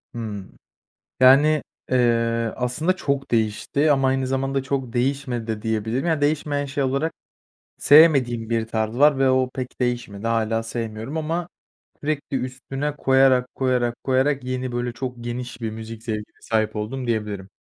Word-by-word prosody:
Hımm. 105 Hz, -, -6 dB, 0.7 s
Yani, 145 Hz, +4 st, +6 dB, 0.3 s
eee, 115 Hz, -2 st, +2 dB
aslında 140 Hz, +9 st, 0 dB
çok 140 Hz, -4 st, -2 dB
değişti 115 Hz, +7 st, +1 dB
ama 135 Hz, -1 st, +2 dB
aynı 130 Hz, 0 st, 0 dB
zamanda 135 Hz, +1 st, -1 dB
çok 130 Hz, -3 st, -3 dB
değişmedi 125 Hz, -2 st, -1 dB
de 110 Hz, -2 st, -4 dB
diyebilirim. 110 Hz, +6 st, -1 dB
Ya, 160 Hz, -3 st, +1 dB
değişmeyen 145 Hz, -1 st, 0 dB
şey 140 Hz, +1 st, -2 dB
olarak 140 Hz, +5 st, 0 dB, 0.7 s
sevmediğim 130 Hz, -7 st, +5 dB
bir 115 Hz, -1 st, 0 dB
tarz 110 Hz, 0 st, -2 dB
var 145 Hz, -1 st, +5 dB
ve 135 Hz, -1 st, +4 dB
o 130 Hz, -1 st, +2 dB
pek 130 Hz, 0 st, -6 dB
değişmedi. 120 Hz, -4 st, -2 dB
Hâlâ 115 Hz, 0 st, +1 dB
sevmiyorum 115 Hz, +3 st, -5 dB
ama 165 Hz, +2 st, -2 dB, 0.5 s
sürekli 145 Hz, -2 st, -2 dB
üstüne 135 Hz, +3 st, -4 dB
koyarak, 130 Hz, -2 st, +4 dB
koyarak, 125 Hz, -2 st, 0 dB
koyarak 135 Hz, 0 st, +1 dB
yeni, 130 Hz, -1 st, -3 dB
böyle, 120 Hz, 0 st, -2 dB
çok 125 Hz, +1 st, -5 dB
geniş 125 Hz, +1 st, -5 dB
bir 115 Hz, -, -2 dB
müzik 110 Hz, 0 st, -8 dB
zevkine 110 Hz, -2 st, -5 dB
sahip 110 Hz, -1 st, 0 dB
oldum 125 Hz, +5 st, -4 dB
diyebilirim. 105 Hz, -4 st, -3 dB
125 Hz, 145 wpm, -23 LUFS, 115-135 Hz, 0.7 s, Yani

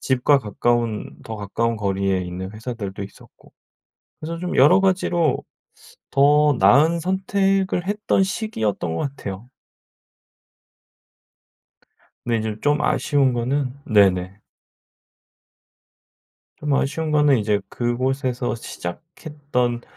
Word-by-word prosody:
집과 130 Hz, +2 st, +3 dB
가까운 115 Hz, 0 st, -1 dB
더 110 Hz, -, -6 dB
가까운 115 Hz, +3 st, -2 dB
거리에 95 Hz, -2 st, 0 dB
있는 90 Hz, +1 st, -6 dB
회사들도 110 Hz, -3 st, -6 dB
있었고 100 Hz, -, -17 dB, 0.7 s
그래서 165 Hz, +2 st, -5 dB
좀 180 Hz, +1 st, -3 dB
여러 165 Hz, +9 st, +6 dB
가지로 180 Hz, -5 st, +1 dB, 0.7 s
더 145 Hz, +1 st, +4 dB
나은 150 Hz, -, +5 dB
선택을 190 Hz, 0 st, 0 dB
했던 205 Hz, -1 st, +1 dB
시기였던 110 Hz, -, -2 dB
것 140 Hz, -, -1 dB
같아요. 100 Hz, 0 st, -7 dB, 2.8 s
근데 120 Hz, -1 st, 0 dB
인제 110 Hz, -1 st, -3 dB
쫌 145 Hz, +1 st, +2 dB
아쉬운 140 Hz, -3 st, +2 dB
거는 125 Hz, +2 st, -1 dB
네네. 95 Hz, -2 st, +2 dB, 2.2 s
좀 150 Hz, -5 st, -1 dB
아쉬운 155 Hz, +4 st, -1 dB
거는 150 Hz, -3 st, +4 dB
이제 105 Hz, -1 st, 0 dB
그곳에서 125 Hz, +1 st, -1 dB
시작했던 125 Hz, -, -4 dB
130 Hz, 220 characters per minute, -22 LUFS, 105-155 Hz, 2.8 s, 여러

